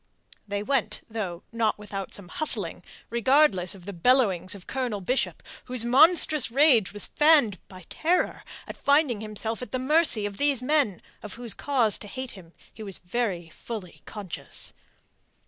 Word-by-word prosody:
They 205 0 -3
went, 220 -4 -1
though 190 -5 -5
not 230 -2 0
without 200 -2 -7
some 200 -3 -7
hustling, 310 - +2 0.3
regardless 235 - +3
of 180 -3 -15
the 200 - -6
bellowings 195 -2 +2
of 190 - -12
Colonel 250 -6 -3
Bishop, 250 +8 -2 0.2
whose 250 -2 -3
monstrous 305 +2 +4
rage 250 -5 +4
was 205 0 -2
fanned 295 - +3
by 185 -3 -13
terror 350 +3 -1 0.2
at - - -8
finding 280 -6 +2
himself 220 +2 -4
at 250 - -7
the 255 - -1
mercy 265 -4 +3
of 200 -1 -5
these 280 -3 +1
men 270 - +1 0.2
of 210 - -7
whose 235 -3 -2
cause 245 -6 +1
to 205 - -10
hate 260 +4 -6
him 175 -4 -14 0.2
he 220 - -12
was 200 -3 -5
very 180 -3 -3
fully 190 +1 -8
conscious. 205 -5 -4
225 Hz, 160 wpm, -26 LUFS, 200-265 Hz, 0.3 s, monstrous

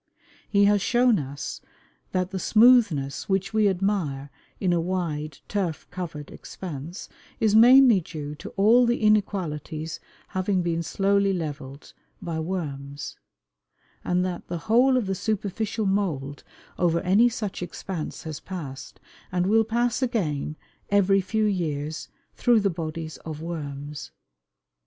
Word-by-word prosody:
He 200 -1 +4
has 205 0 +4
shown 240 -1 +3
us 140 0 -6 0.5
that 185 0 -1
the 190 - -3
smoothness 210 - +4
which 195 +1 0
we 215 -2 +4
admire 175 -8 -1 0.3
in 180 -2 +1
a 170 - +2
wide, 160 -5 -3
turf 185 -6 -2
covered 170 -5 -6
expanse 165 -1 -8 0.3
"is 215 -2 +2
mainly 245 -1 +8
due 150 -2 -6
to 150 - -9
all 230 +5 +5
the 235 - +2
inequalities 175 -7 0 0.3
having 185 -1 0
been 170 -1 0
slowly 195 +3 +1
leveled 145 -5 -6 0.3
by 165 -2 -4
worms," 145 -5 -5 0.8
and 180 +1 +1
that 180 -2 -5
"the 175 - -3
whole 250 +4 +4
of 245 - 0
the 195 - -1
superficial 215 +2 -2
mould 160 -9 -1 0.4
over 170 -1 +2
any 205 +7 +4
such 210 -5 -4
expanse 175 -1 -5
has 155 -3 -6
passed, 150 -8 -8 0.3
and 180 -1 +1
will 220 +3 +4
pass 235 +3 0
again, 160 - -1 0.3
every 195 -1 +4
few 215 +4 0
years, 155 -6 -2 0.2
through 240 -3 +3
the 200 -1 +1
bodies 160 -1 -5
of 155 -2 -7
worms!" 145 -3 -6
185 Hz, 135 wpm, -25 LUFS, 155-205 Hz, 0.8 s, mainly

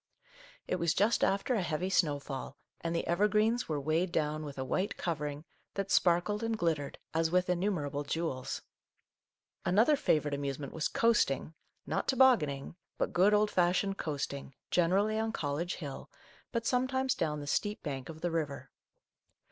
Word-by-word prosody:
It 185 - 0
was 170 -2 +1
just 215 +4 +3
after 200 +7 +2
a 220 - +1
heavy 175 +2 -1
snowfall, 145 -6 -1 0.2
and 165 0 -2
the 165 - -1
evergreens 210 +6 +2
were 150 -2 0
weighed 160 +5 0
down 155 -1 0
with 145 -2 -7
a 130 - -2
white 185 +9 -1
covering 150 -2 -3 0.3
that 195 -1 -2
sparkled 180 +4 +3
and 225 -1 -1
glittered 160 -6 -1 0.2
as 165 0 +2
with 180 +1 +2
innumerable 170 -6 -1
jewels. 145 -3 -3 1.0
Another 225 +11 +4
favourite 150 - +1
amuse 140 -1 -2
ment 140 -2 -7
was 160 - 0
coasting, 210 - +2 0.2
— - - -47
not - - -2
tobogganing, 175 - +3 0.2
but - - -1
good, 190 +4 +5
old 210 0 +3
fashioned 185 +2 +2
coasting, 140 -3 -4 0.2
generally 195 +5 +2
on 220 0 0
Col 145 -9 -2
lege 175 +2 -2
Hill, 145 -5 -7 0.4
but 230 -1 -2
sometimes 260 0 +1
down 150 -9 -1
the 145 - -6
steep 205 +8 -1
bank 135 -1 -4
of 160 -1 -9
the 175 - -1
river. 155 -4 -3
170 Hz, 165 wpm, -32 LUFS, 150-205 Hz, 1.0 s, good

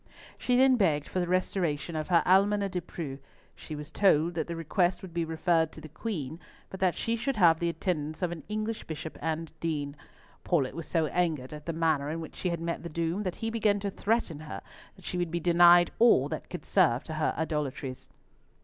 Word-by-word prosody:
She 250 - 0
then 260 0 +5
begged 155 -8 +2
for 185 - -2
the 175 - 0
restoration 175 -3 -1
of 155 -1 -2
her 170 -2 +4
Almoner 200 +2 +4
De 180 -1 -3
Preaux. 150 -5 -6 0.4
She 155 - -8
was 150 0 -8
told 175 -4 +3
that 160 -2 -2
the 170 - -4
request 175 +3 0
would 180 -3 -9
be 170 0 0
referred 160 0 +1
to - - -10
the 155 - -9
Queen, 160 - -5 0.3
but 190 - -7
that 185 -2 +2
she 230 - 0
should 240 +4 -2
have 165 -4 +5
the 170 - 0
attendance 155 -3 -2
of 175 - 0
an 170 -2 -6
English 215 +1 -3
Bishop 160 0 -6
and 160 0 -3
Dean. 150 -3 -2 0.5
Paulett 145 -8 +1
was 165 - -6
so 165 -2 +1
angered 155 -5 -1
at 150 +1 -10
the - - 0
manner 160 -3 +1
in 160 +2 -3
which 160 - -8
she 180 - -2
had 170 -1 -2
met 170 0 -3
the 170 - -6
doom, 170 +4 -1
that 185 -4 -3
he 225 - -1
began 215 -3 +2
to 200 0 -2
threaten 200 -7 -1
her 155 0 -7 0.3
that 190 - -17
she 180 - -3
would 175 -1 -1
be 170 +1 -2
denied 175 0 +6
all 220 - +6
that 155 - -5
could 180 - -7
serve 155 -11 +3
to 160 - -6
her 155 0 0
idolatries. 150 -4 -3
170 Hz, 220 wpm, -29 LUFS, 155-185 Hz, 0.5 s, denied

